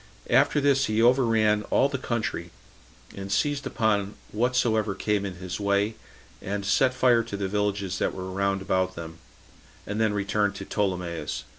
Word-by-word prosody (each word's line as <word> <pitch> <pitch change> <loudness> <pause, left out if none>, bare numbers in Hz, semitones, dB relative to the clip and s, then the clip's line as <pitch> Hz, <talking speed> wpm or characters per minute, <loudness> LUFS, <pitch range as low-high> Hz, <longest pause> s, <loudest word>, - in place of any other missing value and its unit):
After 140 +4 +4
this 140 -1 +3
he 110 0 0
overran 115 -3 +4
all 135 - +4
the 140 -1 -4
country, 110 -9 -3 0.7
and 100 0 -6
seized 145 +7 0
upon 105 -2 0 0.2
whatsoever 110 -3 +1
came 105 0 0
in 95 - -7
his 90 +1 -6
way, 100 +1 +1 0.5
and 100 0 -3
set 130 +5 +3
fire 125 -2 +4
to 115 -3 -6
the 100 -1 -2
villages 100 -1 -1
that - - 0
were 95 0 -5
round 100 0 0
about 95 -1 0
them, 80 -1 -8 0.7
and 105 +2 -2
then 110 -2 +2
returned 100 0 0
to 95 - -7
Ptolemais. 90 -5 -2
105 Hz, 160 wpm, -26 LUFS, 95-115 Hz, 0.7 s, After